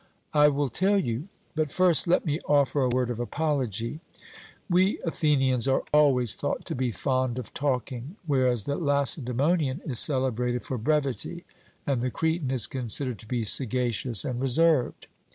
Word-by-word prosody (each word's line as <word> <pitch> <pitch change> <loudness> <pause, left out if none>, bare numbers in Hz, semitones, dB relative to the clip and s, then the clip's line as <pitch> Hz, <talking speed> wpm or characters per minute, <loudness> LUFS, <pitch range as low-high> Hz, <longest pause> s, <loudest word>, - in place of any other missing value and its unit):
I 150 0 +6
will 145 -1 0
tell 195 - +1
you. 130 - -2 0.3
But 155 -2 -1
first 180 -4 +4
let 175 - +2
me 155 0 -1
offer 145 -1 +2
a 130 - +2
word 125 0 0
of 120 - -5
apology. 130 -2 -2 0.7
We 185 +1 +2
Athenians 135 -6 +1
are 135 - +1
always 135 -6 +4
thought - - -3
to - - -4
be 130 0 -1
fond 130 +1 -1
of 125 - -7
talking, 135 +1 -3
whereas 130 -6 +1
the 140 +5 -2
Lacedaemonian 140 0 0
is 130 -8 +2
celebrated 125 -3 0
for 130 - -4
brevity, 150 - -1 0.4
and 135 -4 0
the 130 - -1
Cretan 160 +1 -1
is 130 -4 +2
considered 125 -1 -1
to 110 - -14
be 120 0 -2
sagacious 125 +1 0
and 125 -3 -3
reserved. 140 +1 +1
135 Hz, 155 wpm, -26 LUFS, 125-150 Hz, 0.7 s, I